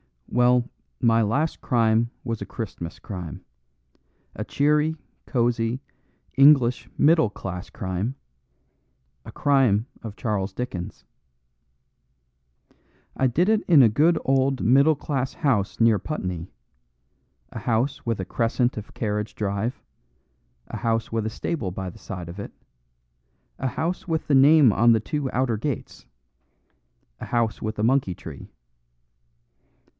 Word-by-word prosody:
"Well, 125 0 +3 0.3
my 115 -1 +3
last 140 +9 0
crime 115 -1 +2
was 115 -3 -4
a - - -3
Christmas 95 -7 -6
crime, 90 -5 -7 0.9
a - - -5
cheery, 150 +2 +2 0.3
cosy, 120 0 0 0.6
English 135 -4 +5
middle 160 -6 +4
class 95 -2 -7
crime; 100 +4 -3 1.1
a - - -9
crime 130 -6 +2
of 110 -3 -7
Charles 105 -5 -2
Dickens. 95 -7 -5 2.1
I 130 - +2
did 165 +10 +1
it 220 -1 +3
in 155 -7 +7
a 115 - +6
good 160 +9 +3
old 135 0 +1
middle 140 +6 +5
class 135 -2 -3
house 120 -10 0
near 115 -3 +5
Putney, 90 - -4 1.0
a - - -6
house 130 +6 -1
with 115 -3 -1
a - - -4
crescent 120 +4 0
of 105 - -8
carriage 105 -1 -3
drive, 100 +3 -3 0.9
a - - -5
house 115 -1 -1
with 115 -1 -1
a - - -1
stable 110 - -3
by 95 +1 -5
the - - -13
side 90 -3 -7
of 90 +4 -9
it, 100 - -7 1.1
a 130 - -1
house 170 +9 -3
with 160 -2 -2
the 145 - +1
name 140 -1 +7
on 115 +3 +5
the 110 - +2
two 145 +2 -3
outer 125 -3 0
gates, 130 +3 -5 1.1
a - - -6
house 115 -2 -1
with 110 +1 -4
a 105 - -1
monkey 120 -6 +2
tree. 75 -5 -10
115 Hz, 130 wpm, -24 LUFS, 105-135 Hz, 2.1 s, in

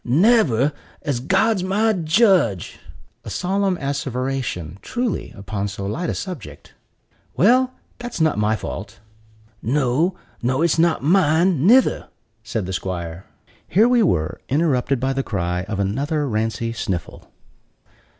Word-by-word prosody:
"Never, 150 - +3 0.3
as 145 -6 -1
God's 195 - +2
my 210 +4 +2
judge!" 170 - +2 0.4
(a - - -8
solemn 190 0 0
asseveration, 130 - -3
truly, 245 -3 -3
upon 100 +1 -3
so 100 -1 -6
light 165 - -2
a - - -2
subject.) 180 - -8 0.6
"Well, 255 +6 +4 0.3
that's 245 -4 -6
not 160 -8 +2
my 105 +1 +2
fault." 105 - -7 0.6
"No, 145 - +1 0.3
nor 130 +6 +1
it's 165 -1 +1
not 165 -4 +2
mine, 170 -1 +3
_ni_ther," 255 +4 +4 0.4
said 110 -2 -3
the 95 - -5
'squire. 90 -1 -5 0.4
Here 215 +6 +4
we 245 -1 +4
were 85 - 0
interrupted 135 -3 +1
by 130 +2 0
the 135 - 0
cry 90 -6 -2
of 105 -1 -4
another 140 - -1
Rancey 115 0 -1
Sniffle. 95 -7 -5
140 Hz, 130 wpm, -21 LUFS, 110-185 Hz, 0.6 s, Well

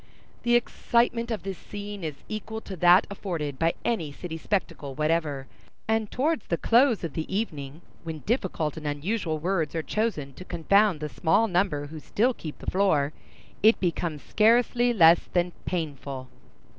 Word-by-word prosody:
The 240 0 +3
excitement 235 0 +1
of 220 -5 -3
this 195 -2 -5
scene 205 -2 -7
is 155 -3 -5
equal 220 +1 -5
to 195 - -7
that 175 +3 +6
afforded 160 -9 -4
by 165 0 +2
any 170 -11 -1
city 160 +3 -7
spectacle 165 -5 -3
whatever; 150 -3 0 0.4
and 220 -1 +1
towards 300 0 0
the 170 - 0
close 235 +1 +3
of 165 -4 -4
the 160 +4 -4
evening, 155 -7 -3 0.2
when 160 -2 -6
difficult 185 - -1
and 155 -1 -5
unusual 160 +3 -1
words 165 -1 -1
are 160 - -1
chosen 180 -12 -2
to 180 - -10
confound 190 0 +2
the 150 - -2
small 180 +9 +2
number 180 -6 0
who 155 +2 -8
still 235 - +1
keep 155 -9 -8
the - - -4
floor, 160 -7 +2 0.5
it 220 +2 +5
becomes 170 -4 -2
scarcely 240 +2 +3
less 170 -6 +5
than 175 0 +2
painful. 140 -6 -4
175 Hz, 160 wpm, -26 LUFS, 155-215 Hz, 0.5 s, that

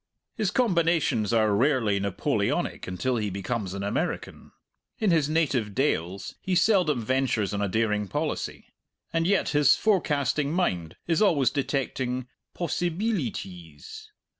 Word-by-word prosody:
His 215 -5 0
combinations 170 - +1
are 110 -3 +3
rarely 115 -4 +2
Napoleonic 100 -2 -1
until 120 +8 -1
he 105 -2 -1
becomes 100 0 -3
an 100 - -4
American. 100 - -3 0.5
In 215 -4 +2
his 155 -3 +2
native 140 -10 0
dales 95 - -1
he 185 - -1
seldom 180 - +3
ventures 130 -6 0
on 100 - -1
a 100 - 0
daring 105 0 0
policy. - - -3 0.5
And 165 0 +1
yet 200 0 +2
his 145 -2 +5
forecasting 150 - +1
mind 90 - -1
is 165 +3 +1
always 155 - +3
detecting 130 -3 -2 0.3
"possibeelities." 160 - -3
130 Hz, 125 wpm, -26 LUFS, 105-165 Hz, 0.5 s, his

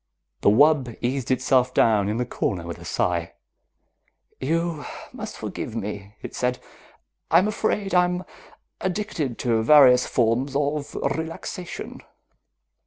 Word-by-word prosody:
The - - +5
wub 135 +1 +4
eased 125 0 -2
itself 130 0 +2
down 105 -3 +3
in 105 - -1
the 125 - 0
corner 90 -7 -2
with 85 - -6
a - - -11
sigh. 85 -1 -1 1.1
"You 165 +2 -1 0.3
must - - -7
forgive - - -5
me," 100 0 -5
it - - -7
said. 125 0 -1 0.7
"I'm 175 +5 +5
afraid 210 -2 -1
I'm 180 0 +2 0.6
addicted 180 - -2
to 115 -2 +2
various 125 -1 +6
forms 125 +4 +1
of 145 0 -1
relaxation. 160 +4 -4
130 Hz, 120 wpm, -24 LUFS, 115-160 Hz, 1.1 s, various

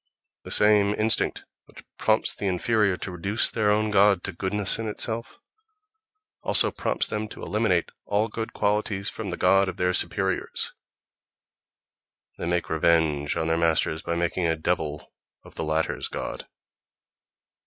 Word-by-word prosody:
The - - -8
same 105 -1 +3
instinct 110 -1 +1 0.2
which - - -15 0.2
prompts - - +3
the 100 - -4
inferior 100 +1 +1
to 95 - -6
reduce 95 +6 +2
their 110 -2 +1
own 105 +1 +1
god 100 -2 +4
to 100 - -3
"goodness 100 +3 +1
in 115 - -3
itself" 115 +2 -1 1.0
also - - +2
prompts - - -1
them 105 0 -3
to - - -11
eliminate 105 -5 0
all 105 +2 +1
good 115 +1 -5
qualities 105 -1 -1
from 110 -3 -6
the 90 - -4
god 95 +1 +3
of - - -7
their 90 0 +1
superiors; 95 0 0 1.7
they - - -3
make 85 0 -1
revenge 80 -2 +1
on 80 - -1
their 80 0 0
masters 80 -1 +1
by 85 - -3
making 85 +1 -1
a 80 - +1
devil 80 -2 -3 0.3
of - - -15
the - - -5
latter's 80 +1 -1
god. - - -6
95 Hz, 150 wpm, -25 LUFS, 85-105 Hz, 1.7 s, god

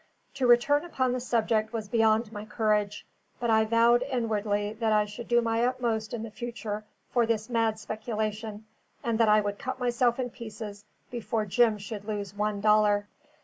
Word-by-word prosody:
To 265 -2 0
return 260 +5 +5
upon 260 -7 0
the 255 - -1
subject 225 -2 0
was 220 -2 -3
beyond 220 0 +2
my 210 -2 -6
courage; 210 -1 0 0.3
but 235 -1 0
I 220 0 +4
vowed 230 +2 +4
inwardly 215 -5 -1
that 225 -2 +1
I 210 -1 +4
should 210 +3 -8
do 240 0 +4
my 230 0 +1
utmost 235 -3 -1
in 230 -2 -4
the 225 - -7
future 220 -2 -5 0.3
for 240 -2 +2
this 220 0 -1
mad 225 -2 +1
speculation, 215 -1 -4 0.4
and 230 -1 0
that 225 -2 +5
I 210 0 +6
would 205 0 -3
cut 260 - -4
myself 240 -1 +2
in 245 -2 -2
pieces 215 -3 -8 0.3
before 225 -2 -2
Jim 220 +2 +3
should 205 0 -7
lose 205 -3 -4
one 210 0 -1
dollar. 210 -1 +4
220 Hz, 180 wpm, -28 LUFS, 210-240 Hz, 0.4 s, I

